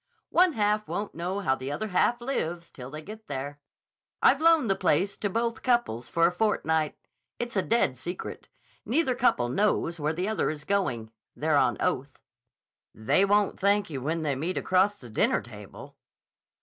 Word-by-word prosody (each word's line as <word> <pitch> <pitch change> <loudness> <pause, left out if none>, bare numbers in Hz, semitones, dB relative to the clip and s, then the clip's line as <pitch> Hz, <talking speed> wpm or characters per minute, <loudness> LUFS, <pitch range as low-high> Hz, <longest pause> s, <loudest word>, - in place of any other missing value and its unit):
"One 360 -1 +4
half 210 -2 +1
won't 205 0 -4
know 180 +4 -3
how 130 - +2
the 135 +1 -4
other 215 +9 -3
half 235 +6 +2
lives 175 -10 -3
till 125 -1 -9
they 155 +2 -8
get 215 +4 -10
there. 140 +1 -5 0.6
I've 280 - +4
loaned 325 -5 +5
the 195 - +2
place 185 +3 +1
to 205 - -2
both 230 +2 -1
couples 240 - 0
for 165 0 +3
a - - +4
fortnight. 160 -6 0 0.4
It's 240 -1 -4
a 190 - +3
dead 185 - +1
secret. 175 +6 -6 0.3
Neither 265 +1 +1
couple 240 - +2
knows 170 +2 0
where 150 +1 0
the 180 +4 -2
other 220 - 0
is 150 -1 -5
going. 130 - -1 0.2
They're - - +1
on - - +3
oath." - - -2 0.8
"They 110 - +2
won't 205 0 +2
thank 200 -2 +2
you 135 -3 -4
when 160 +4 -2
they 145 -3 0
meet 165 +7 -3
across 190 +3 +2
the 125 - -12
dinner - - +2
table." 105 -4 -12
185 Hz, 175 wpm, -27 LUFS, 145-215 Hz, 0.8 s, loaned